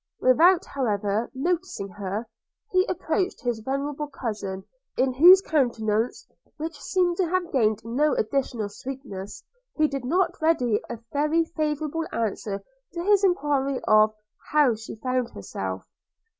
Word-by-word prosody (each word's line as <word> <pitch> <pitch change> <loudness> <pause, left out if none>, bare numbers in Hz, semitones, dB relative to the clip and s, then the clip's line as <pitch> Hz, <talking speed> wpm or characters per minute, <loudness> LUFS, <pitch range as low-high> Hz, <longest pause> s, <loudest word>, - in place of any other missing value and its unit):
Without, 340 +8 +5
however, 210 -4 -1
noticing 340 - -2
her, 200 +4 -4 0.4
he 370 0 +3
approached 365 +2 -1
his 240 -2 -1
venerable 280 +5 -3
cousin, 210 -8 -5 0.3
in 260 0 +2
whose 355 +8 +8
countenance, 230 - 0 0.3
which 310 -1 -6
seemed 355 -2 +1
to 375 - +2
have 360 0 -1
gained 215 -5 +1
no 275 +6 +1
additional 235 -2 -1
sweetness, 205 -3 -8 0.3
he 310 -1 +4
did 275 -3 -4
not 340 +7 0
read 325 +1 +3
a 235 -1 -1 0.2
very 305 +3 +2
favourable 310 0 -2
answer 210 -2 -3 0.3
to 340 0 -4
his 405 +1 +4
enquiry 290 -8 +1
of 215 0 +6 0.2
– - - -21
how 295 -5 +5
she 220 0 -8
found 255 +1 -1
herself? 95 -1 -5
270 Hz, 135 wpm, -25 LUFS, 220-325 Hz, 0.4 s, whose